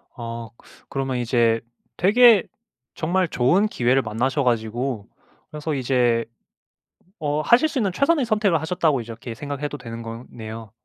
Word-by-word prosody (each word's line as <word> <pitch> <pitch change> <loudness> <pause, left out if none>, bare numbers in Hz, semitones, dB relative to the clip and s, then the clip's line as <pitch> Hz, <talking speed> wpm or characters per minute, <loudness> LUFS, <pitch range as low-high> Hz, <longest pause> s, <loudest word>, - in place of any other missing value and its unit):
아 115 -2 -6
그 - - -22 0.2
그러면 135 -2 -2
이제 115 -2 +2 0.4
되게 220 +2 +6 0.5
정말 180 +3 0
좋은 170 +10 +2
기회를 130 - +2
만나셔 130 +5 -1
가지고 120 -1 -1 0.4
그래서 150 0 -4
이제 125 -3 +1 0.9
어 150 -1 0
하실 235 - +4
수 300 -3 -2
있는 200 -5 +1
최선의 280 - +2
선택을 210 -7 +2
하셨다고 160 -5 +1
이렇게 115 +1 -8
생각해도 145 +1 -5
되는 115 -3 -8
거네요. 115 -1 -8
135 Hz, 305 characters per minute, -23 LUFS, 115-175 Hz, 0.9 s, 되게